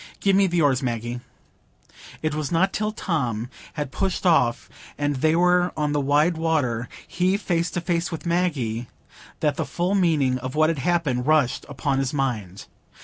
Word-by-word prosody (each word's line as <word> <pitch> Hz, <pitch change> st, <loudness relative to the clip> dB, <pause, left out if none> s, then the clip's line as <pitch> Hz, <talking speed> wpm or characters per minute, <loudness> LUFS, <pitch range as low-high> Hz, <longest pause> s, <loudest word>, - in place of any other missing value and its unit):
Give 195 Hz, -1 st, +3 dB
me 195 Hz, 0 st, +4 dB
the 170 Hz, -2 st, +1 dB
oars, 135 Hz, -2 st, +3 dB
Maggie." 120 Hz, -1 st, -3 dB, 1.0 s
It 155 Hz, -1 st, 0 dB
was 155 Hz, -1 st, -3 dB
not 185 Hz, +3 st, +2 dB
till 215 Hz, 0 st, -1 dB
Tom 125 Hz, -, -2 dB, 0.2 s
had 145 Hz, -4 st, -4 dB
pushed 195 Hz, -1 st, -2 dB
off 125 Hz, -9 st, +3 dB, 0.3 s
and 145 Hz, -1 st, -1 dB
they 155 Hz, +4 st, +2 dB
were 180 Hz, +1 st, +3 dB
on 150 Hz, -1 st, 0 dB
the 145 Hz, 0 st, +1 dB
wide 150 Hz, +5 st, +2 dB
water,—he 160 Hz, -, -1 dB
face 175 Hz, -4 st, -1 dB
to 175 Hz, -, -3 dB
face 170 Hz, 0 st, -1 dB
with 165 Hz, -, -6 dB
Maggie,—that 150 Hz, -3 st, -2 dB
the -, -, 0 dB
full 175 Hz, +3 st, -1 dB
meaning 155 Hz, -9 st, +2 dB
of 130 Hz, +2 st, -6 dB
what 155 Hz, +1 st, +4 dB
had 160 Hz, -, -4 dB
happened 140 Hz, -5 st, 0 dB
rushed 155 Hz, -5 st, +2 dB
upon 140 Hz, -1 st, -1 dB
his 135 Hz, +1 st, -1 dB
mind. 110 Hz, -9 st, -2 dB
150 Hz, 165 wpm, -24 LUFS, 130-175 Hz, 1.0 s, me